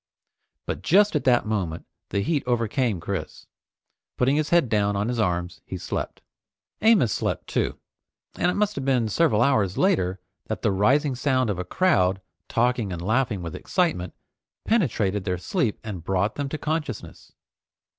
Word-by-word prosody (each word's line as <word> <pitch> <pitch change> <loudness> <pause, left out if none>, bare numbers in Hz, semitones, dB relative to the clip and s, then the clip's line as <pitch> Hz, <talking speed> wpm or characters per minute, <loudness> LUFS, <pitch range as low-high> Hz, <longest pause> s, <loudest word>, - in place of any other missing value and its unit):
But - - -4
just 200 +1 +4
at 150 - 0
that 125 -3 +4
moment 95 -7 -2 0.2
the 100 - 0
heat 145 +7 0
overcame 115 -3 0
Chris. 90 -2 -5 0.7
Putting 130 +3 +3
his 155 0 0
head 170 -5 +4
down 105 -2 +1
on 100 +3 -1
his 120 -1 -2
arms, 90 -2 -1
he 95 - -6
slept. - - -5 0.6
Amos 205 - +4
slept - - -2
too, - - -1 0.6
and 175 - +1
it - - -1
must 210 0 +1
have 135 - -2
been 125 -4 +1
several 120 -3 +3
hours 110 -8 +2
later 95 - +2 0.3
that - - -4
the - - +3
rising 130 +9 +2
sound 130 -3 +1
of 95 - -4
a - - -1
crowd 95 - +2 0.3
talking 120 -3 +1
and 90 - -4
laughing 110 -2 0
with 85 -2 -5
excitement 160 - -1 0.5
penetrated 105 - +1
their 90 -2 -1
sleep 115 - -1
and 100 -7 -6
brought 95 +4 0
them 145 -1 -3
to 155 - -3
consciousness. 155 0 -4
115 Hz, 165 wpm, -25 LUFS, 95-145 Hz, 0.7 s, just